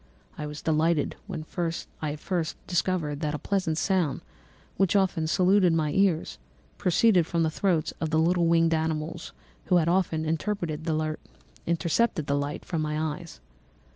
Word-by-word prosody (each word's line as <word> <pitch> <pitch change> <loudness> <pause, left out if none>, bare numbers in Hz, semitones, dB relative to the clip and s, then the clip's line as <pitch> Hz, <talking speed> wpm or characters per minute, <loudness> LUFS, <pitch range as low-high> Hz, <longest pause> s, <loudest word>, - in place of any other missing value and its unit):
I 150 - -5
was 150 0 -8
delighted 160 -1 +1
when 165 -6 -5 0.6
I 150 -1 -2
first 165 0 -3
discovered 170 -4 -1
that 150 -1 -1
a - - -2
pleasant 185 -3 -1
sound, 170 -4 +1 0.5
which 195 +1 +2
often 185 -5 +2
saluted 185 +1 +4
my 155 -2 +1
ears, 185 -2 +1 0.4
proceeded 180 -1 +3
from 170 -1 +1
the 160 - +1
throats 170 -2 0
of 160 - 0
the 160 - +1
little 170 +1 +3
winged 165 0 +4
animals 160 +1 -2 0.3
who 180 - +2
had 165 -2 +2
often 170 -3 +1
intercepted 160 -1 -2
the 160 +2 -1
light 145 +1 -3
from 165 -3 -2
my 150 0 -1
eyes. 160 - -5
165 Hz, 145 wpm, -27 LUFS, 155-180 Hz, 0.6 s, saluted